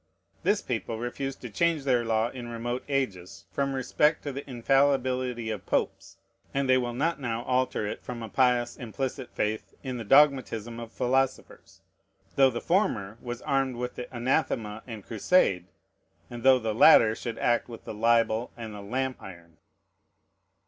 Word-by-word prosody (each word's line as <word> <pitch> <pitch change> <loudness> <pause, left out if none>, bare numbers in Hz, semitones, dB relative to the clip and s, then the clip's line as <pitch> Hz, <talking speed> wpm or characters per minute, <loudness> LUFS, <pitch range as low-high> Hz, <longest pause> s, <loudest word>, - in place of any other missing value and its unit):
This 205 0 +1
people 115 -2 -3
refused 130 +3 -4
to 125 - -6
change 165 +2 +1
their 125 -3 +2
law 115 0 +1
in 125 -1 -8
remote 120 +1 -4
ages 100 -13 -3
from 140 +6 -1
respect 150 +4 +1
to 145 - -3
the 140 +1 -7
infallibility 130 -2 +1
of 105 -4 -6
Popes, - - -2 0.4
and 140 -1 +1
they 130 - +5
will 120 -1 -3
not 155 +5 0
now 115 -2 -2
alter 130 -4 0
it 105 - -5
from 120 -2 -6
a - - -5
pious 125 -1 +2
implicit 130 +2 -5
faith 110 +1 -2
in 130 -2 -4
the 115 - -5
dogmatism 120 -3 +3
of 115 -1 -8
philosophers, 130 +1 -2 0.5
though 135 -1 +6
the 120 -2 -4
former 115 - 0
was 120 -1 -6
armed 135 -2 0
with 125 +1 -4
the 125 - -8
anathema 120 -4 -1
and 110 -5 -8
crusade, 100 - +2 0.6
and 120 -1 -7
though 130 +1 +6
the 110 -3 -2
latter 110 0 +7
should 115 0 -5
act 120 +1 +1
with 115 - -9
the - - -6
libel 115 +1 +2
and 115 -2 -7
the 105 - -8
lamp 130 +5 -3
iron. 85 -4 -12
120 Hz, 165 wpm, -27 LUFS, 115-135 Hz, 0.6 s, latter